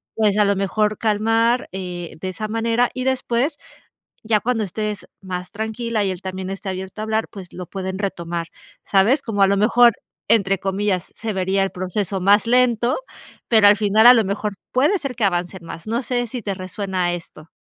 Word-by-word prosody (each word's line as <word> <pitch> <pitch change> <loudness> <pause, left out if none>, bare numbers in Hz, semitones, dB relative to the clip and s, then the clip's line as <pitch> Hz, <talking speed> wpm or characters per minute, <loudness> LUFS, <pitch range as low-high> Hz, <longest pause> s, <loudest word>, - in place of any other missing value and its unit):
pues 210 -2 +2
a 210 - +4
lo 200 0 +2
mejor 210 +2 0
calmar, 225 +3 +1
eh, 180 -3 -6
de 185 - -3
esa 215 +3 -5
manera. 230 +2 +1
Y 255 0 -4
después, 260 +2 0 0.7
ya 215 -2 +2
cuando 235 -2 0
estés 210 +2 -4
más 180 -1 -6
tranquila, 220 +1 -2
y 190 - 0
él 180 - -7
también 190 0 -5
esté 195 +1 -7
abierto 190 +2 -6
a - - -2
hablar, 220 0 0
pues, 190 -4 -11
lo 180 - -7
pueden 190 -1 -5
retomar, 170 -4 -3 0.4
¿sabes? 215 +9 +3
Como 205 -3 -2
a - - +6
lo 200 - +2
mejor, 235 +3 +5 0.4
entre 195 -3 +3
comillas, 195 -1 -1
se 225 -1 -4
vería 190 +1 +1
el 195 - -2
proceso 190 +2 -2
más 200 +3 +4
lento, 245 -1 +3 0.5
pero 220 -3 +6
al 205 - +6
final, 215 +2 +3
a 245 - +11
lo 225 -3 +3
mejor, 205 +1 -2 0.2
puede 295 +10 +3
ser 275 -3 -5
que 225 - -3
avancen 180 -1 -2
más. 165 +3 -9
No 230 +3 0
sé, 245 -1 -1
si 245 +2 -5
te 200 - -2
resuena 185 -1 -2
esto. 165 -2 -9
205 Hz, 195 wpm, -21 LUFS, 190-225 Hz, 0.7 s, a